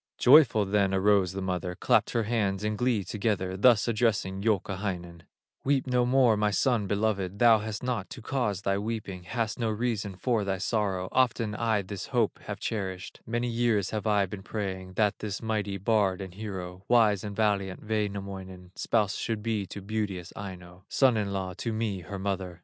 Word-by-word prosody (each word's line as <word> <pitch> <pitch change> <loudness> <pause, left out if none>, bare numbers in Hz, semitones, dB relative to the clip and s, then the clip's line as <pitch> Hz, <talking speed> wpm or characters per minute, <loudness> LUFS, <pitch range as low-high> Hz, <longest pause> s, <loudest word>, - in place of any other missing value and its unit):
Joyful 125 -6 +6
then 100 -1 +2
arose 95 -1 +3
the 95 0 -4
mother, 90 -1 -2
Clapped - - +2
her 115 - +1
hands 105 -3 0
in 105 0 0
glee 120 -2 +1
together, 95 -1 -1
Thus 115 +3 +5
addressing 105 -4 0
Youkahainen: 95 -5 -2 0.4
"Weep 135 -1 +2
no 125 -1 +2
more, 125 -3 +4
my 105 0 +2
son 110 0 +1
beloved, 100 -2 -1
Thou 115 -1 +6
hast 110 +1 -5
naught 120 -6 -2
to - - -8
cause 110 -7 -1
thy 100 0 +1
weeping, 105 -4 -4
Hast 115 +2 -2
no 115 -2 0
reason 110 -3 -2
for 115 +2 0
thy 95 -1 -1
sorrow, 95 -2 -1
Often 115 -4 +1
I 110 -2 0
this 95 +1 -6
hope 120 -5 0
have - - -5
cherished; 95 -4 -4
Many 120 +2 -1
years 115 -4 +1
have 110 0 -2
I 105 -2 +3
been 95 +1 -8
praying 95 -3 -5
That 105 0 +1
this 105 -2 -4
mighty 105 -3 -2
bard 100 -2 +1
and 95 -2 -7
hero, 95 -3 -6
Wise 110 -5 +4
and 105 -1 -5
valiant 100 -2 0
Wainamoinen, 100 -4 -4
Spouse 105 -4 +1
should 110 -2 -3
be 110 -4 -1
to 100 - -8
beauteous 100 -4 -3
Aino, 90 -2 -9
Son 130 -3 +4
in 105 -2 -1
law 95 -2 -3
to 115 - -2
me, 110 -3 -2
her 100 +3 -7
mother." 95 -3 -3
105 Hz, 180 wpm, -28 LUFS, 95-110 Hz, 0.4 s, Joyful